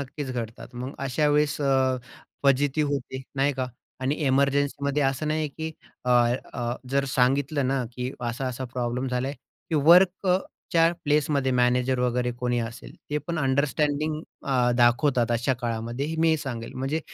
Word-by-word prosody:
नक्कीच 140 0 -5
घडतात. 120 +1 -6
मग 125 +3 -5
अशा 150 +3 +1
वेळेस 150 0 +2
अ, 135 -2 +2 0.5
फजिती 140 +2 +3
होते 130 -1 -3
नाही 140 +2 +2
का 130 -1 -2 0.3
आणि 135 +3 0
एमर्जन्सीमध्ये 140 +1 +1
असं 135 +3 0
नाहीये 155 -1 0
की 160 +3 -5 0.4
अ, 125 - 0 0.4
अ, 120 0 -2 0.2
जर 140 0 +2
सांगितलं 135 +2 +2
ना 135 -2 0
की 125 +1 -3
असा-असा 125 +1 -3
प्रॉब्लेम 125 +1 -2
झालाय 125 +2 -1 0.4
की - - 0
वर्क 175 +6 +5
अ, 180 0 +4 0.3
च्या 165 0 +5
प्लेसमध्ये 145 -2 +2
मॅनेजर 125 +1 +2
वगैरे 125 0 +1
कोणी 125 -1 0
असेल, 115 +1 -7 0.2
ते 150 - +1
पण 160 +3 -4
अंडरस्टँडिंग 150 +2 +1 0.2
अ, 125 -3 +2
दाखवतात 120 0 +3
अशा 120 +3 +1
काळामध्ये 120 +6 -2
मी 165 0 +4
हे 160 - +3
सांगेल. 120 -6 -5
म्हणजे 135 +5 -1
135 Hz, 155 wpm, -26 LUFS, 125-145 Hz, 0.5 s, वर्क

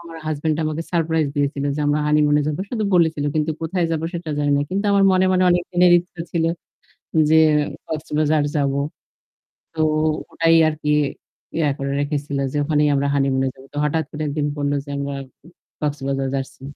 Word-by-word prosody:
আমার 170 -1 -11
হাসব্যান্ড 155 0 -1
আমাকে 155 +1 -2
সারপ্রাইজ 160 -2 +1
দিয়েছিল 140 -1 0
যে - - -2
আমরা 145 +1 +2
হানিমুন 150 0 +3
এ - - +2
যাব। 150 -1 -2
শুধু 220 -4 -1
বলেছিল। 160 -4 +2
কিন্তু 155 +1 0
কোথায় 170 +2 -1
যাব 160 - -1
সেটা 170 -2 -5
জানি 145 -1 +1
না। - - +1
কিন্তু 195 +2 -1
আমার 200 0 +4
মনে, 185 0 +3
মনে 185 0 +3
অনেকদিনের 175 0 +3
ইচ্ছে 175 0 -9
ছিল 165 -2 +1 0.9
যে 160 - +6 0.5
কক্সবাজার 155 -1 0
যাবো। 140 -1 +1 0.9
তো 160 - -9 0.5
ওটাই 165 0 +3
আরকি 155 -1 -3 0.7
ইয়ে 155 -3 +2
করে 140 -1 -3
রেখেছিল 145 -1 -2
যে 150 - -3
ওখানেই 150 0 +2
আমরা 140 +1 +1
হানিমুনে 135 -1 +1
যাবো। 130 0 -16
তো - - -7
হঠাৎ 160 +2 +1
করে 150 - -6
একদিন 145 0 -1
বলল 145 -1 0
যে - - -11
আমরা 140 0 -3 0.7
কক্সবাজার 135 -2 -2
যাচ্ছি। 135 -1 -5
150 Hz, 170 wpm, -21 LUFS, 145-165 Hz, 0.9 s, যে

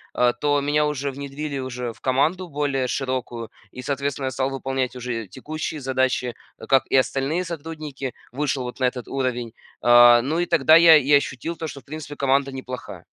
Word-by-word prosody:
э, 125 0 +3
то 145 -1 +2
меня 150 +1 +2
уже 140 -1 -2
внедрили 140 +1 -5
уже 125 -2 -4
в - - -24
команду 160 +8 +1
более 140 -3 -1
широкую 125 -4 -3 0.2
и, 125 - -9
соответственно, 140 0 -2
я - - -2
стал 130 +1 -1
выполнять 135 -1 -2
уже 120 -3 -4
текущие 155 - -6
задачи, 130 -2 0 0.3
как 135 -1 +3
и - - 0
остальные 135 +6 +1
сотрудники, 155 -5 -6 0.2
вышел 135 0 -1
вот 125 +1 -7
на 130 - +2
этот 125 -1 -2
уровень. 125 -4 -2 0.3
А, 120 0 +7
ну 150 +7 -1
и 175 - +1
тогда 165 -2 +5
я 165 -1 +8
и 145 -1 +3
ощутил, 145 +3 +1
то 160 - -4
что, 140 -2 -8
в - - -35
принципе, 150 0 -7
команда 140 0 +1
неплохая. 130 -1 -8
135 Hz, 180 wpm, -23 LUFS, 125-150 Hz, 0.3 s, я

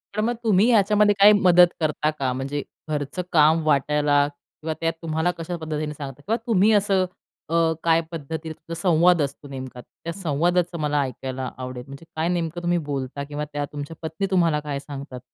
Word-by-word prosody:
तर 215 - +1
मग 235 +2 0
तुम्ही 210 0 +4
याच्यामध्ये 210 -1 +4
काही 210 +1 +9
मदत 180 -3 +6
करता 155 -1 0
का? 135 -4 -2
म्हणजे 135 +2 -3 0.3
घरचं 150 +4 -2
काम 155 0 +5
वाटायला 145 0 +3
किंवा 155 +2 -8
त्यात 165 0 +1
तुम्हाला 160 +2 0
कशा 165 +1 -4
पद्धतीने 155 -1 -4
सांगता 140 -1 -8
किंवा 225 +8 -1
तुम्ही 215 -1 +4
असं 195 -2 +3 0.4
अ, - - -4 0.3
काय 165 0 +4
पद्धतीने 160 +1 -5
तुमचा 165 +2 -10
संवाद 175 -2 +4
असतो 145 +1 -4
नेमका, 130 -2 -7
त्या 170 - -9
संवादाचं 175 +1 0
मला 150 -1 +1
ऐकायला 130 0 -5
आवडेल. 125 -1 -6
म्हणजे 140 +4 -11
काय 160 +1 0
नेमकं 175 -1 -2
तुम्ही 175 0 +1
बोलता 135 +1 -3
किंवा 150 +1 -4
त्या 145 0 -1
तुमच्या 145 +2 -6
पत्नी 160 +4 -3
तुम्हाला 165 -5 +3
काय 145 -2 -4
सांगतात? 140 -3 -8
155 Hz, 175 wpm, -24 LUFS, 145-175 Hz, 0.4 s, काही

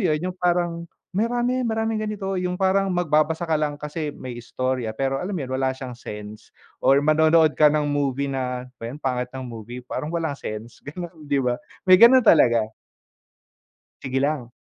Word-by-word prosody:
yun? 155 - +2 0.2
Yung - - -26
parang 175 -1 0 0.2
marami, 240 +5 0
maraming 225 -2 -1
ganito. 195 -3 -3
Yung 180 0 -2
parang 195 +1 +2
magbabasa 160 -2 +1
ka 165 - -2
lang 150 -1 -1
kasi 150 +1 -4
may 130 - -7
istorya, 120 -1 -3
pero 135 +1 -1
alam 190 +1 -3
mo 150 - -3
yun? 130 - -7
Wala 130 - +2
siyang 130 -2 -7
sense, 105 -2 -9 0.3
or 135 - +5
manonood 155 +1 +4
ka 150 0 +5
ng 150 0 +1
movie 140 -1 -1
na, 125 -1 -3
ano 125 - -17
bayan 115 +4 -6
pangit 125 -4 -2
ng 130 0 -7
movie, 120 +1 -8
parang 150 - -4
walang 165 -2 -2
sense, 110 -4 -7
gano'n, 175 +4 -7
di 145 -1 -1
ba? 125 -1 0 0.2
May 185 -1 +7
gano'n 245 +1 +8
talaga. 120 - +5 1.4
Sige 135 0 -1
lang. 140 -4 -1
150 Hz, 175 wpm, -23 LUFS, 130-180 Hz, 1.4 s, gano'n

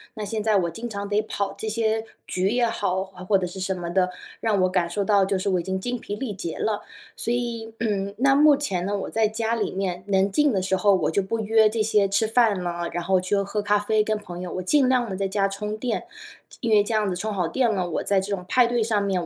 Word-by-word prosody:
那 215 -2 -4
现 215 +1 -3
在 215 -1 +3
我 175 -3 +1
经 225 +8 -6
常 200 -2 -5
得 205 +1 +1
跑 200 -2 -3
这 220 - -4
些 220 0 0 0.2
局 185 +1 0
也 240 +2 +2
好， 190 -4 -1
或 190 +1 0
者 185 -1 -2
是 180 +2 -8
什 190 +1 -1
么 175 -1 -5
的， 180 +1 +2 0.3
让 215 -3 +1
我 185 - +3
感 180 -2 0
受 200 +3 -1
到 200 -2 +4
就 195 0 0
是 200 - -1
我 185 -2 +2
已 - - -9
经 190 +2 -2
精 245 +5 -3
疲 205 -3 -6
力 255 -5 -4
竭 170 -4 -5
了。 215 -2 -1 0.3
所 235 - -1
以， 235 -2 -3
嗯， 200 -3 -1
那 270 +2 +4
目 295 0 +6
前 190 -11 -2
呢， 205 +1 -1
我 195 - -4
在 225 -1 +2
家 225 +1 -1
里 230 - -1
面 185 -1 -3
能 195 0 +2
静 295 +6 +3
的 195 -5 0
时 190 +1 0
候 200 +2 +4
我 175 - 0
就 200 - +1
不 210 +4 -3
约 220 0 +4
这 220 0 -1
些 210 -2 +2
吃 200 +3 +2
饭 220 -4 +3
了， 175 -1 -3
然 175 - -3
后 185 +1 +2
去 185 +2 0
喝 200 +1 -1
咖 205 0 +2
啡 215 +1 +1
跟 215 0 0
朋 175 -4 -8
友， 180 - -5
我 185 - -2
尽 260 +8 +3
量 250 -3 +2
地 190 - -3
在 195 +1 -1
家 195 0 +1
充 210 +2 -4
电， 235 -1 -2 0.6
因 230 - -1
为 210 -1 +6
这 225 - -3
样 215 -2 +1
子 180 - -2
充 210 +4 -3
好 180 -4 0
电 235 +6 +1
了， 185 -3 -1
我 165 - -2
在 200 -1 +2
这 200 +1 -2
种 180 -2 -9
派 250 -2 +4
对 240 -1 +1
上 215 -2 +1
面 190 -3 -1
205 Hz, 295 characters per minute, -24 LUFS, 190-220 Hz, 0.6 s, 目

